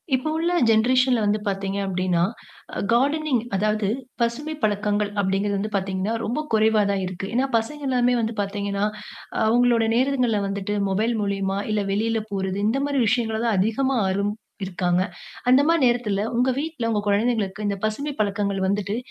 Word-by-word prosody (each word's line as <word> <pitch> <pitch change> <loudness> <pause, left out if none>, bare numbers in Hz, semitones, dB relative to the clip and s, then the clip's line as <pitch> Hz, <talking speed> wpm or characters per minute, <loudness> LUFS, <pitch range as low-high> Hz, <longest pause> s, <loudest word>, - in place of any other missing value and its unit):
இப்பொ 260 +5 -2
உள்ள 340 +2 0 0.2
ஜென்ரேசன்ல 250 +2 +4
வந்து 210 +1 +1
பாத்தீங்க 195 0 -2
அப்டின்னா, 185 -2 0 0.7
கார்டானிங் 280 +2 +2 0.2
அதாவது, 210 +1 +1 0.3
பசுமைப் 290 +7 -1
பழக்கங்கள் 205 0 +1
அப்டிங்கிறது 200 +1 0
வந்து 215 +2 -3
பாத்தீங்கன்னா, 190 +2 -1
ரொம்பக் 300 +7 -3
குறைவா 220 0 +4
தான் 195 -1 -1
இருக்கு. 185 +1 -5
ஏன்னா, 260 +2 +3
பசங்க 290 +7 -4
எல்லாமே 250 -1 +2
வந்து 225 0 -2
பாத்தீங்கன்னா, 200 0 -2 0.5
அ - - +1
அவுங்களுடைய 235 -1 +3
நேரங்கள்ல 250 -4 +2
வந்துட்டு, 200 +1 -3
மொபைல் 220 +5 +1
மூலியமா, 195 -1 -1
இல்ல 210 -1 +1
வெளில 220 +2 0
போறது, 190 -1 -2
இந்த 265 +5 +1
மாரி 280 -3 +1
விஷயங்கள 225 -1 +1
தான் 225 -4 +2
அதிகமா 255 +7 +1
ஆர்வம் 200 +2 0 0.3
இருக்காங்க. 180 -1 0 0.5
அந்த 260 +2 +7
மாரி 335 -2 +3
நேரத்தில 215 -4 0
உங்க 250 +2 +2
வீட்ல, 295 -6 -3
உங்க 210 -2 +1
கொழந்தைங்களுக்கு, 210 -1 0
இந்தப் 200 -1 -3
பசுமை 280 +7 -3
பழக்கங்கள் 200 -1 -1
வந்துட்டு, 200 +2 -1
215 Hz, 155 wpm, -23 LUFS, 200-245 Hz, 0.7 s, அந்த